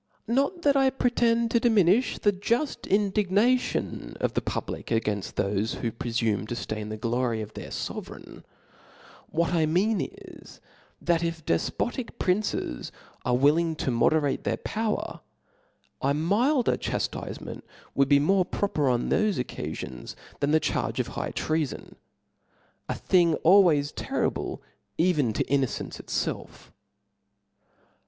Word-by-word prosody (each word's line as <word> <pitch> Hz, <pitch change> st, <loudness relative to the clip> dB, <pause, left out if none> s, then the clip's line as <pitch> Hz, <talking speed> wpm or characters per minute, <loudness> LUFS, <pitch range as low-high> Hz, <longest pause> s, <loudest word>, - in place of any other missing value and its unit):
Not 280 Hz, -, 0 dB
that 285 Hz, -1 st, +4 dB
I 270 Hz, -1 st, +5 dB
pretend 235 Hz, -3 st, +1 dB
%o 235 Hz, -, +5 dB
diminiOi 220 Hz, -1 st, +3 dB
the 205 Hz, -, +3 dB
juft 235 Hz, +9 st, -1 dB
indig^^ 200 Hz, 0 st, +2 dB
nation 240 Hz, +6 st, +1 dB
of -, -, 0 dB
the -, -, 0 dB
public -, -, -4 dB
againfl: 105 Hz, -3 st, -1 dB
thofe 100 Hz, +3 st, 0 dB
who 115 Hz, -, -2 dB
prefume 115 Hz, -3 st, -1 dB
to 120 Hz, -, -3 dB
ftain 110 Hz, -2 st, -4 dB
the 110 Hz, -, -4 dB
glory 115 Hz, +1 st, 0 dB
of 110 Hz, 0 st, -6 dB
their -, -, -7 dB
fovereign; -, -, -7 dB, 0.9 s
what 170 Hz, +2 st, 0 dB
I 160 Hz, -2 st, +3 dB
mean 195 Hz, +7 st, +2 dB
is, -, -, -9 dB, 0.4 s
that 170 Hz, -1 st, +1 dB
if 165 Hz, -2 st, -3 dB
defpotic 235 Hz, -, -1 dB
princes 185 Hz, -, -1 dB, 0.3 s
are 125 Hz, -1 st, +2 dB
willing 160 Hz, +5 st, +3 dB
to 140 Hz, -, -1 dB
moderate 145 Hz, +3 st, +2 dB
their -, -, 0 dB
power, 220 Hz, -1 st, -2 dB, 0.8 s
a 140 Hz, +1 st, +2 dB
milder 235 Hz, -, +2 dB
chaftifcment -, -, -4 dB, 0.3 s
would 140 Hz, 0 st, +2 dB
be 140 Hz, -, +7 dB
more 185 Hz, +7 st, +3 dB
proper 155 Hz, -7 st, 0 dB
on 120 Hz, -1 st, 0 dB
thofe 215 Hz, -2 st, +2 dB
occafions, 65 Hz, -, -5 dB, 0.2 s
than 140 Hz, -, +1 dB
the 160 Hz, +1 st, +4 dB
charge -, -, -1 dB
of -, -, -1 dB
high -, -, -4 dB
treafon, 155 Hz, -3 st, -2 dB, 1.0 s
a -, -, -1 dB
thing 170 Hz, -3 st, +3 dB
always 165 Hz, -6 st, +5 dB
terrible -, -, -2 dB, 0.3 s
even 155 Hz, -8 st, +2 dB
to -, -, 0 dB
innocence 135 Hz, -2 st, -1 dB
itfelf*. -, -, -4 dB
165 Hz, 135 wpm, -27 LUFS, -, 1.0 s, be